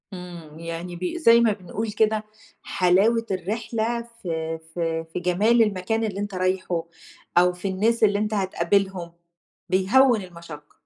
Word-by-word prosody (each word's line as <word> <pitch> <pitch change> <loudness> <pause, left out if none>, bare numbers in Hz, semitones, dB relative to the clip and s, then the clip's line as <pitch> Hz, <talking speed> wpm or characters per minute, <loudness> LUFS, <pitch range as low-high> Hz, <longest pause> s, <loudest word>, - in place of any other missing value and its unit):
إمم، 170 -4 -9
يعني 170 +1 -6
ب 175 - -8
زي 235 -8 +6
ما 225 -2 +3
بنقول 205 +3 -5
كده، 215 0 +1 0.4
حلاوة 200 +6 +2
الرحلة 225 +5 -2 0.2
في 160 -2 -3
في 165 -1 -2
في - - -2
جمال 200 +7 +3
المكان 210 +1 0
اللي 200 -3 -3
أنت 205 -1 -4
رايحُه، 185 -2 -1 0.5
أو 180 +1 +5
في 180 +2 -5
الناس 220 +5 +1
اللي 205 -1 +4
أنت 210 +1 -1
هتقابلهم، 190 -2 0 0.6
بيهوّن 220 +5 +4
المشقة. 170 -4 -11
190 Hz, 140 wpm, -24 LUFS, 175-215 Hz, 0.6 s, زي